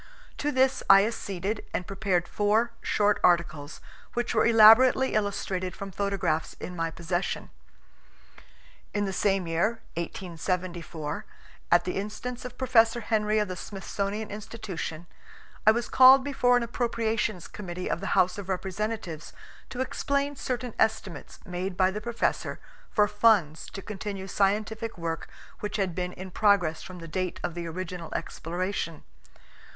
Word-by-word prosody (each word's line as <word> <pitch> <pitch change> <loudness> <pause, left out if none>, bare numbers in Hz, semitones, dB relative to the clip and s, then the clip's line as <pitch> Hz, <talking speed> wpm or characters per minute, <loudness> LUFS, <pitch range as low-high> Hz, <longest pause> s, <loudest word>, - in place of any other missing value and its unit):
To 295 - 0
this 260 0 +2
I 195 +1 +8
acceded 205 -2 -3
and 180 - -2
prepared 190 -3 0
four 215 +3 +2
short 210 0 +2
articles, 165 -4 +1 0.3
which 240 0 -1
were 220 - +4
elaborately 235 +4 +7
illustrated 195 -3 -1
from 200 0 -7
photographs 190 -5 -1
in 180 - -6
my 165 -1 -1
possession. 175 +3 -3 1.4
In 205 0 +1
the 195 - -3
same 195 -1 +1
year 170 +8 0
1874 175 0 -4 0.5
at 175 0 +6
the 180 - -3
instance 235 +5 -5
of 250 - -8
Professor 240 -2 +4
Henry 215 -1 +1
of 210 -1 +2
the 185 - -4
Smithsonian 200 +3 -4
Institution, 200 -6 -6 0.6
I - - +11
was 235 +2 -1
called 260 +1 +8
before 250 -3 +3
an 245 - 0
appropriations 230 -4 -1
committee 180 -3 -6
of - - -1
the - - -1
House 185 +2 +3
of 195 -1 -7
Representatives 190 -3 -3 0.4
to 255 - -4
explain 280 +2 -1
certain 250 -3 -3
estimates 220 -5 -1
made 180 +1 -4
by 185 0 +4
the 210 +2 -5
Professor 235 +1 -1 0.3
for 210 -1 +3
funds 205 -7 +3
to 195 - -8
continue 200 -2 -5
scientific 215 +3 0
work 165 -1 -4 0.3
which 210 +1 -3
had 190 -4 0
been 180 +1 -3
in 185 0 -8
progress 190 -6 +3
from 185 - -9
the 165 -1 -9
date 180 +2 -3
of 175 - -2
the 170 0 -5
original 175 0 -6
exploration. 175 -1 -3
200 Hz, 145 wpm, -27 LUFS, 180-220 Hz, 1.4 s, I